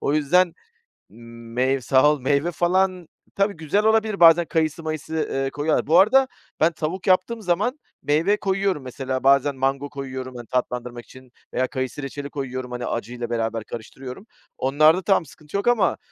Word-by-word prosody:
O 145 - 0
yüzden 165 +4 +3 0.6
meyv 115 +3 -3
sağ 130 +4 +4
ol, 150 - -2
meyve 140 +5 +1
falan 180 0 0 0.3
tabii 200 +1 +1
güzel 165 +5 -1
olabilir 220 -2 +2
bazen 170 0 +7
kayısı 160 0 -1
mayısı, 155 0 -3
eee, 135 0 -1
koyuyorlar. 145 +1 -1
Bu 165 +3 +6
arada 260 +7 +5 0.3
ben 165 +2 +4
tavuk 170 +5 -4
yaptığım 190 +5 +2
zaman, 215 - 0 0.2
meyve 165 +8 +2
koyuyorum 195 -6 -1
mesela 130 0 -4
bazen 140 +1 +4
mango 135 +2 -1
koyuyorum. 130 -2 -7
Hani, 120 -2 -9
tatlandırmak 125 -2 -3
için 130 -1 -16 0.2
veya 130 0 0
kayısı 130 +1 -4
reçeli 140 +1 -6
koyuyorum, 130 -3 -5
hani, 125 0 -4
acıyla 120 0 -4
beraber 115 -1 -2
karıştırıyorum. 125 - -9 0.3
Onlarda 155 +6 +4
tamam 190 -3 +2
sıkıntı 150 +3 -13
yok 200 - -3
ama 220 -7 +3
145 Hz, 160 wpm, -23 LUFS, 130-180 Hz, 0.6 s, bazen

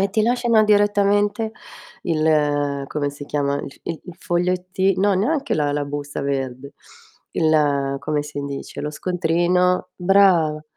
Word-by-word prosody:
e 195 0 +1
ti 215 +2 +1
lasciano 235 -1 +3
direttamente 205 +1 +2 0.5
il 150 -3 +1
come 145 -1 -2
si 145 0 -9
chiama? 140 -1 -1
il 145 - -6
f - - -12
i 165 - -6
il 180 -2 -10
foglietti 185 +2 0
no, 200 0 +3
neanche 275 - 0
la 145 -1 0
la 145 0 -1
busta 145 0 -5
verde. 135 -1 -4 0.6
Il 145 -4 +1
come 150 0 -1
si 150 -1 -6
dice? 140 -1 -6
Lo 150 - -3
scontrino. 180 +1 +1
Brava. 175 -5 +3
160 Hz, 145 wpm, -21 LUFS, 145-195 Hz, 0.6 s, lasciano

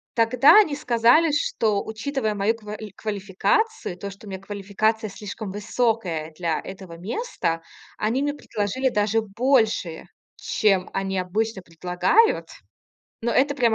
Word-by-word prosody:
тогда 240 - +6
они 315 -9 +3
сказали, 250 +4 +4
что, 220 -7 0
учитывая 220 0 -2
мою 205 +3 +1
ква 210 -1 -7 0.2
квалификацию, 210 - -1
то, 200 +2 -6
что 200 +2 -13
у - - -8
меня 190 -1 -6
квалификация 205 +2 -1
слишком 205 +1 -7
высокая 205 -6 -1
для 170 -3 -1
этого 185 -3 -9
места, 180 - -2 0.4
они 225 +5 0
мне 290 0 0
предложили 260 -1 -2
даже 215 -1 +1
больше, 220 -5 +1 0.3
чем 195 -4 +1
они 195 0 -2
обычно 200 +3 -1
предлагают. 180 - +2 0.7
Но 235 - -1
это 280 +2 +3
прям 235 -5 +2
215 Hz, 130 wpm, -24 LUFS, 195-245 Hz, 0.7 s, тогда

